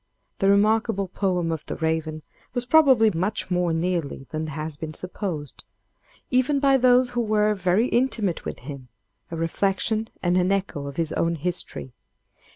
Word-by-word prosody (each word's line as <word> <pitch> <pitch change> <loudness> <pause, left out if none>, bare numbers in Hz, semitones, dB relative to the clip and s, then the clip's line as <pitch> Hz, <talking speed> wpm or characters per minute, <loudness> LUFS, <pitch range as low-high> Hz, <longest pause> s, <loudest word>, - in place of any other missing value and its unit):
The 195 - +3
remarkable 210 0 +2
poem 180 -3 -1
of 160 -2 -3
'The - - -3
Raven' 160 -1 -2 0.3
was 245 0 -1
probably 260 -6 +5
much 185 +2 -2
more 180 -1 +1
nearly 165 -4 -2
than 155 0 -3
has 155 0 -5
been 155 +1 -7
supposed, 180 -6 -5 0.7
even 260 +3 +2
by 275 -1 +4
those 250 0 +4
who 240 -1 0
were 215 -1 +2
very 190 +3 +2
intimate 225 -8 0
with - - -6
him, 135 -1 -8 0.4
a 165 - -5
reflection 195 +6 0
and 175 0 +2
an 185 +1 +2
echo 190 -8 -2
of 140 - -8
his 165 -2 -1
own 170 0 0
history. 165 -5 -4
185 Hz, 160 wpm, -24 LUFS, 160-220 Hz, 0.7 s, probably